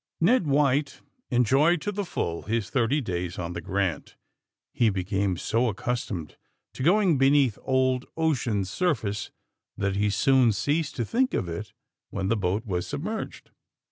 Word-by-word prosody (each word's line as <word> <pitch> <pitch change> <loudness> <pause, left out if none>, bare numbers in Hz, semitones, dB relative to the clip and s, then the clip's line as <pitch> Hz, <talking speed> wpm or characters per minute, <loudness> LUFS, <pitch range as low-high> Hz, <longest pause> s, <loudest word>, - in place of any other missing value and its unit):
Ned 185 +1 +3
White 140 0 +1 0.3
enjoyed 135 +8 +3
to 205 - -2
the 205 0 -2
full 85 - -3
his 110 -1 -2
thirty 135 +4 +2
days 90 -5 -3
on 90 0 -4
the 85 - -5
*^ - - -20
Grant.'' 95 -4 -2 0.6
He 115 - +3
became 95 -1 -1
so 115 +7 +1
accustomed 105 -6 -4 0.4
to - - -8
going 175 -1 +3
beneath 135 -4 +4
Old 130 -1 +1
Ocean's 120 - 0
surface 110 - -1 0.5
that 100 -1 -1
he 105 +1 +1
soon 125 +3 +4
ceased 150 +6 -1
to 120 - -1
think 255 - +1
of 90 - -1
it 85 +5 -6 0.4
when 95 -1 -2
the 115 - +3
boat 100 +2 -1
was 90 -4 -2
sub 145 +1 -4
merged. 220 +3 -5
120 Hz, 160 wpm, -26 LUFS, 100-145 Hz, 0.6 s, beneath